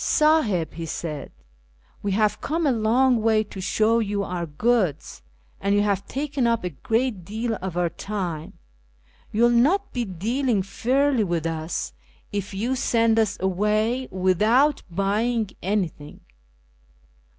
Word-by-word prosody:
" - - -3 0.2
Sahib," 245 - +3
he 165 0 -6
said, 150 -2 -5 0.4
" - - -35
we 200 -1 -1
have 210 +1 +1
come 325 +3 -1
a 280 - +4
long 240 +2 +3
way 220 -1 +3
to 200 -2 -9
show 215 +5 +2
you 205 -2 -1
our 180 -3 -3
goods, 180 - 0 0.4
and 200 +1 +1
you 205 - +3
have 200 -1 0
taken 275 -2 -1
up 230 -3 +1
a 180 - -2
great 225 - -1
deal 225 +6 -3
of 185 -2 -4
our 175 -2 +1
time. 175 -4 -4 0.8
You 220 +3 +2
will 240 - +6
not 310 +13 +2
be 245 - -1
dealing 225 +3 -1
fairly 255 +5 +1
with 170 -4 -1
us 160 - -3 0.4
if 205 -1 -3
you 225 +7 -1
send 230 -3 +2
us 215 -2 +1
away 215 +7 0
without 215 - +3
buying 210 +4 0
anything." 180 -7 -3
210 Hz, 150 wpm, -24 LUFS, 185-240 Hz, 0.8 s, will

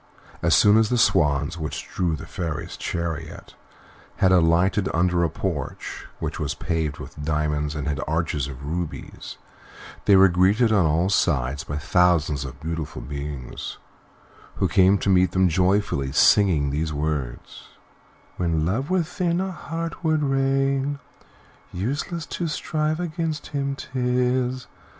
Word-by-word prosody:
As - - +4
soon 105 +1 +6
as 110 -1 +3
the 125 - +1
swans 75 -4 +2
which 75 -1 -5
drew 85 -4 -1
the 75 - -9
Fairy's 80 -4 -5
chariot 85 -3 -5 0.6
had 95 - +3
alighted 90 +3 +3
under 85 0 +2
a 85 - +2
porch, 75 -4 -5
which - - -4
was - - -2
paved 80 -3 -2
with 75 - -9
diamonds 75 -1 -1
and 75 0 -3
had 75 0 -1
arches 80 -3 -1
of 70 0 -9
rubies, 85 +2 -5 0.7
they 100 - +6
were 95 0 +8
greeted 95 +6 +3
on 100 -6 +4
all 85 +5 +1
sides 70 -8 +1
by 75 - -4
thousands 75 -3 +2
of 65 +1 -9
beautiful 80 -3 -4
beings, 70 0 -6 0.8
who - - +1
came 95 +1 +4
to - - -4
meet 90 -2 +3
them 95 0 +4
joyfully, 90 -5 +1
singing 75 -2 +4
these 75 +2 -1
words: 75 -4 -4 0.7
"When 80 -3 0
Love 115 - -1
within 180 -1 0
a 190 0 -2
heart 165 0 -5
would 155 -2 +2
reign, 135 +1 +1 0.7
Useless 145 - -3
to 170 - -3
strive 155 0 -1
against 165 -3 -3
him 140 -1 -1
'tis. 125 -1 -1
90 Hz, 140 wpm, -24 LUFS, 75-125 Hz, 0.8 s, were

